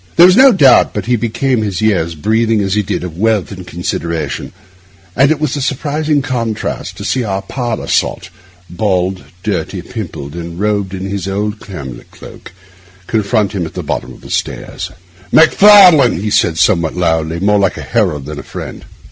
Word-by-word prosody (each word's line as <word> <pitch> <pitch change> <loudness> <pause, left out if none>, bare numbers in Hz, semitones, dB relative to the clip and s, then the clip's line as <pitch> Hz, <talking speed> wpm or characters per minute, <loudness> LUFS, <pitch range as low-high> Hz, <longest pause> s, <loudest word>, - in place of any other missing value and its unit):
There 170 - +8
was 185 0 +6
no 265 +2 +7
doubt 145 - +4
but - - -3
he 125 +1 +1
became 115 +2 -1
his 100 -5 -2
years, 90 -6 0
breathing, 110 +6 +1
as 95 -1 -1
he 105 - +2
did, 95 - -3
of 85 -1 -7
wealth 110 -3 +1
and 95 -2 -9
consideration; 85 -1 -4 0.6
and 135 +2 +4
it 155 -1 +1
was 155 0 -1
a 145 - -3
surprising 150 +2 -1
contrast 115 -5 -3
to - - -7
see 130 - 0
our 100 -2 -3
parlour 120 +2 -4
sot—bald, 90 +1 -2 0.2
dirty, 100 -2 -3
pimpled, 70 +1 -7
and 85 0 -7
robed 100 -2 -1
in 95 0 -5
his 100 -1 -4
old 105 +2 -2
camlet 70 -10 -9
cloak—confront 95 +3 -5
him 90 -5 -3
at - - -13
the - - -4
bottom - - -4
of - - -14
the - - -11
stairs. - - -4 0.4
'Macfarlane!' 170 - +6
he 105 +2 -3
said 80 -4 +2
somewhat 85 -3 +2
loudly, 80 -1 0
more 105 +2 +2
like 95 -1 0
a - - -6
herald 90 - -1
than 75 0 -7
a - - -6
friend. - - -8
100 Hz, 175 wpm, -14 LUFS, 90-120 Hz, 0.6 s, There